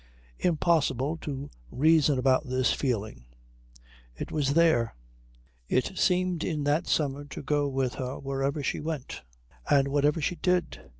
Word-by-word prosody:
Impossible 155 -4 +1
to 140 -3 -6 0.2
reason 150 - +3
about 130 +2 +2
this 130 0 +2
feeling. 110 - -3 0.9
It - - -6
was 145 -2 0
there. 160 -9 +3 0.7
It 130 +9 0
seemed 180 -2 +1
in 150 -3 -2
that 150 +4 +1
summer 145 -2 0
to 145 - -8
go 145 +1 +1
with 135 -2 -1
her 130 +1 -4
where 135 0 -4
ever 140 +2 -1
she - - -1
went 155 -4 -5 0.5
and 140 -1 +4
whatever 145 +3 +2
she 170 +4 -1
did. 180 -1 0
145 Hz, 140 wpm, -28 LUFS, 135-160 Hz, 0.9 s, and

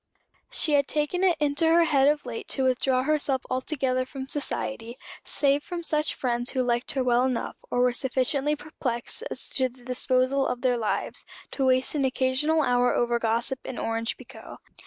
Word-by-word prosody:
She 305 - +2
had 280 -1 +3
taken 305 +5 0
it 360 -4 +3
into 295 +2 +1
her 335 +1 +5
head 280 -4 +3
of 295 -1 +1
late 235 -2 -6
to 265 - 0
withdraw 255 0 +2
herself 285 -3 +1
altogether 255 -1 0
from 265 +1 -7
society, 260 -4 -3 0.3
save 280 0 +1
from 345 +2 -6
such 305 -1 0
friends 245 -1 -1
who 260 -2 0
liked 240 0 0
her 265 - 0
well 245 0 +3
enough, 255 -2 -2
or 245 - +1
were 250 0 +3
sufficiently 270 +4 0
perplexed 270 - -4
as - - -1
to 260 -2 0
the 245 0 -20
disposal 255 +2 +1
of 245 - -3
their 255 -2 +2
lives, 225 -3 -1 0.3
to 270 -2 0
waste 255 0 +3
an 290 -2 0
occasional 265 +4 +1
hour 245 -1 +2
over 240 0 +1
gossip 230 +3 0
and 255 - -6
orange 225 0 -2
pekoe. - - -12
260 Hz, 180 wpm, -26 LUFS, 245-290 Hz, 0.3 s, her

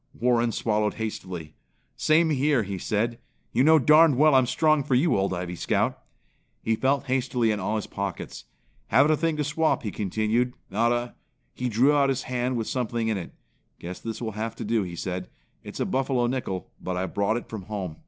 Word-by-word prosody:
Warren 120 -1 +2
swallowed 105 -2 0
hastily. 95 -8 -5 0.4
"Same 160 +1 +3
here!" 140 -3 +2
he 95 -1 -5
said. 115 +4 -1 0.3
"You 125 - +2
know 160 +2 +7
darned 150 0 +6
well 155 +1 +5
I'm 130 -2 +5
strong 155 +3 +2
for 130 - +1
you, 155 +7 +3
Old 95 0 +1
Ivy 90 -1 -4
Scout." - - 0 0.6
He 110 - +1
felt 135 +4 +1
hastily 125 -3 +1
in 105 - -1
all 105 +3 -1
his 105 - -2
pockets. 100 -2 -5 0.4
"Haven't 145 +3 +4
a - - +4
thing 160 0 -1
to 150 - 0
swap," 155 +1 0
he 105 - -3
continued, 110 +6 0 0.2
"not 115 +4 +2
a 120 0 -1 0.2
" - - -45
He 125 - -3
drew 125 +6 +4
out 140 -1 +3
his 135 0 -1
hand 125 0 -1
with 115 - -2
something 120 -3 -2
in 110 - 0
it. 85 - -8 0.5
"Guess 90 +2 -7
this 115 -1 -5
will 110 - -2
have 110 +2 -4
to - - -6
do," 115 +1 +1
he 90 -3 -5
said. 90 +1 -4 0.3
"It's - - -8
a - - +1
buffalo 130 -2 0
nickel, 120 -8 -3
but 90 -1 -3
I 95 - -1
brought 100 +3 0
it 120 - -7
from 105 -5 -7
home. 95 -7 -5
115 Hz, 205 wpm, -26 LUFS, 105-135 Hz, 0.6 s, know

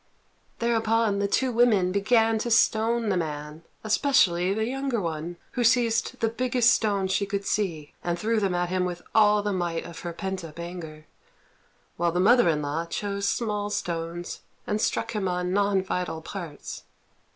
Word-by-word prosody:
Thereupon 225 -2 +1
the 200 - +1
two 255 +5 +1
women 225 -6 +3
began 225 +3 +3
to 240 - -2
stone 230 0 +3
the 190 - +1
man, 150 -1 -4 0.2
especially 205 -6 +3
the 220 +2 0
younger 265 -1 -1
one, 165 -1 -4
who 245 - -1
seized 235 -1 +2
the 225 - +3
biggest 245 +1 +2
stones 200 -3 0
she 200 +1 0
could 200 0 -3
see 165 -9 -2
and 175 0 -1
threw 220 +4 +1
them 195 -3 0
at 175 0 0
him 185 0 0
with 175 -1 -4
all 210 -1 +5
the 205 -1 -1
might 175 -3 -2
of 170 -1 -9
her 175 - -5
pent 190 +1 -4
up 160 -1 -10
anger; 170 -3 -7 0.9
while 170 0 +1
the 175 - -1
mother 225 0 +5
in 150 -2 0
law 155 +4 -2
chose 200 +2 -2
small 210 -3 -1
stones 175 -3 -4 0.2
and 210 +1 -1
struck - - 0
him 210 -4 -1
on 180 0 -1
non 200 -1 +2
vital 180 -4 -3
parts. 170 -6 -7
200 Hz, 175 wpm, -26 LUFS, 175-225 Hz, 0.9 s, all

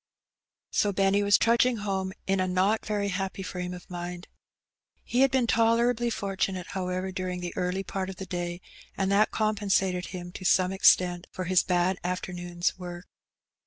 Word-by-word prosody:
So 205 - +2
Benny 195 +1 +2
was 200 0 +5
tmdgmg 235 0 +3
home 190 -2 -2
in 195 0 +1
a 185 - +1
not 190 +4 +1
very 205 -1 0
happy 195 0 -3
frame 180 -1 -4
of 180 -1 -9
mind. 175 0 -6 0.8
He 245 - 0
had 270 - +6
been 260 -2 +2
tolerably 235 +1 +2
for 200 -3 -3
tunate^ 185 -2 -1
however, 185 0 -3
daring 185 -1 -3
the 175 -1 -5
early 185 +1 -1
part 195 -1 -4
of 190 - -6
the 190 - -7
day, 175 -1 -4 0.4
and 195 0 0
that 205 +2 +4
compensated 200 -4 0
him 175 -1 -7
to 185 - -9
some 185 0 +3
extent 180 -2 +4
for 185 - -5
his 185 0 +3
bad 180 +1 +1
afternoon's 175 0 -2
work. 175 0 -7
190 Hz, 170 wpm, -27 LUFS, 180-200 Hz, 0.8 s, had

